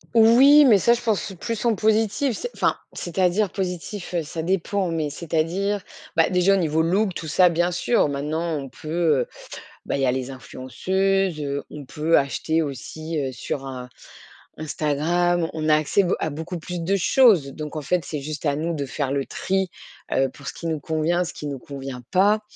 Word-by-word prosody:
Oui, 255 +7 +7
mais 220 -5 +7
ça, 235 +5 +4
je 240 - -2
pense, 220 -4 +1
c'est 195 - -7
plus 230 0 -3
en 235 - +4
positif, 220 +4 +1
c'est 485 - -5
enfin, - - +1 0.2
c'est-à-dire 185 +3 0
positif, 185 +1 -4
heu, 170 - +1
ça 160 +1 -5
dépend, 190 +1 0
mais 155 -3 -1
c'est-à-dire, 170 +6 -1 0.3
bah, - - +4
déjà 185 +2 +3
au - - +3
niveau 160 -3 +1
look, 190 +3 +1
tout 160 - -5
ça, 180 +4 +5
bien 175 +1 +1
sûr. 180 +3 +2
Maintenant, 155 +3 -2
on 135 - -7
peut, 155 - -13 0.3
heu, - - -3 0.6
bah, - - -1
il - - -2
y - - +4
a 125 - +3
les 130 0 -3
influenceuses, 185 - -1
heu, 140 -1 -3
on 150 - -8
peut 155 +5 +1
acheter 160 +4 0
aussi, 155 +3 -4
heu, 135 -2 -2
sur, 135 +3 -5
un 125 -2 -7 0.7
Instagram. 160 +3 0
On 155 -1 -2
a 155 - +6
accès, 155 +6 +2
be 180 - -1
à - - -1
beaucoup 160 +4 -5
plus 175 +1 -5
de 195 +4 +1
choses, 185 - +4
donc 150 0 -6
en 155 - -3
fait, 180 +3 0
c'est 150 +1 -4
juste 150 +2 -6
à 145 -1 +1
nous 165 +2 -1
de 140 -2 -2
faire 135 0 -2
le 140 -1 -1
tri, 190 -1 -1 0.4
heu, 135 - +2
pour 140 - -15
ce - - -4
qui 170 - -6
nous 155 -3 -2
convient, 160 +4 0
ce 175 - -6
qui 150 - -6
nous 140 -2 -5
convient 135 -2 -7
pas, 205 +3 +4
165 Hz, 205 wpm, -23 LUFS, 150-190 Hz, 0.7 s, Oui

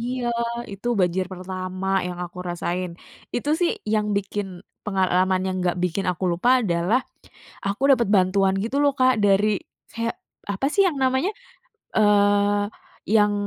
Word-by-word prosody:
Iya, 245 +1 -3 0.5
itu 200 +5 -5
banjir 180 +1 +1
pertama 185 +1 -5 0.2
yang 180 -1 -5
aku 175 +1 -11
rasain. 175 +1 -2 0.4
Itu 265 +5 -1
sih 350 - +3 0.2
yang 210 -1 +1
bikin 200 0 -2 0.4
pengalaman 185 -1 +2
yang 190 - -1
enggak 180 -1 0
bikin 180 +2 -1
aku 180 +1 -4
lupa 175 +8 0
adalah, 180 +5 +1 0.7
aku 200 +4 -2
dapet 240 -5 +3
bantuan 190 +1 +3
gitu 230 +5 -3
loh 285 - +4
Kak, 255 0 +5
dari 200 +1 +4 0.4
kayak 230 0 -3 0.4
apa 195 - -2
sih 400 - +4
yang 320 -6 -2
namanya, 260 +8 +2 0.7
eee 205 -1 +4 0.5
yang 210 -1 +5
200 Hz, 145 wpm, -23 LUFS, 185-230 Hz, 0.7 s, Kak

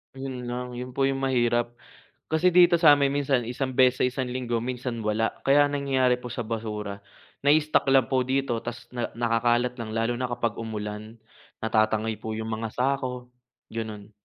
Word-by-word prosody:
'Yon 130 -2 -6
lang, 125 +1 -4
'yon 125 0 -7
po 135 - +1
'yong 135 0 +1
mahirap, 120 -3 +1 0.5
kasi 160 +3 +2
dito 175 0 +6
sa'min 145 -4 +6
minsan 135 -4 +1
isang 130 +2 -2
beses 130 0 +4
isang 130 0 -3
linggo, 125 -2 -2
minsan 125 0 -4
wala. 110 +1 0 0.2
Kaya 145 +1 +6
ang 145 - -1
nangyayari 130 -3 +2
po 125 - -10
sa 120 - -3
basura, 105 -3 -4 0.5
nai-stock 155 +1 +3
lang 135 -4 +4
po 130 -2 +1
dito, 130 -2 0
tas 120 +2 -7
na 120 -1 -3
nakakalat 120 +1 +1
lang, 115 -2 -5
lalo 115 +1 +1
na 130 - -1
kapag 115 -2 -2
umulan, 110 -1 -5 0.5
natatangay 110 -1 +1
po 110 0 -5
'yong 110 0 -4
mga 110 0 -3
sako, 125 -1 -2 0.4
gano'n. 110 -2 -6
125 Hz, 170 wpm, -26 LUFS, 115-135 Hz, 0.5 s, dito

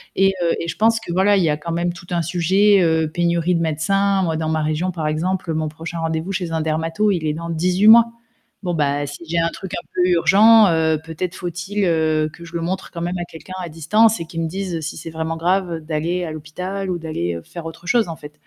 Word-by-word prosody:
Et 195 0 +3
heu, 170 - +2
et 170 - -4
je - - -3
pense 225 +1 +3
que 175 - -7
voilà, 195 +3 +4
il 190 - +2
y 160 - +2
a 150 - +2
quand 165 +2 -6
même 175 +1 -1
tout 175 0 -13
un 175 -1 +1
sujet, 190 +4 +3
heu, 160 -1 +2
pénurie 170 +1 +1
de 165 - 0
médecins. 195 +5 +1
Moi 165 -2 0
dans 160 0 -2
ma 160 0 0
région 155 +4 -1
par 160 -3 -3
exemple, 165 +2 -1
mon 155 -1 -1
prochain 165 +2 -7
rendez-vous 165 +2 -2
chez 180 -3 -3
un 160 - -1
dermato, 165 +6 0
il 170 -5 -1
est 150 - 0
dans 170 +2 -6
18 180 +5 +2
mois. 230 +1 +8 0.5
Bon, 175 -2 -1
bah, 145 -2 0
si 145 +3 -8
j'ai 170 - -1
un 165 0 +2
truc 190 0 -8
un - - -6
peu 180 0 +2
urgent, 200 +6 +6
heu, 160 -1 +2
peut-être 165 +3 -4
faut-il, 180 +4 -3
heu, 155 -2 +2
que 170 - -12
je 170 0 -12
le 170 - -1
montre 185 +3 -3
quand 170 - -6
même 175 +1 -2
à - - -2
quelqu'un 170 +2 -11
à 175 - -5
distance 210 +8 +3
et 165 - -4
qu'il 165 0 -5
me 165 - -1
dise 185 0 -3
si 155 - -5
c'est 165 - -7
vraiment 160 0 -3
grave 175 0 0
d'aller 160 +3 -2
à 165 - -4
l'hôpital 180 +6 -5
ou 180 - -1
d'aller 90 - -3
faire 170 - -8
autre 165 +2 -11
chose 225 +3 +2
en 165 - -5
fait. 150 -1 -12
170 Hz, 250 wpm, -20 LUFS, 160-185 Hz, 0.5 s, mois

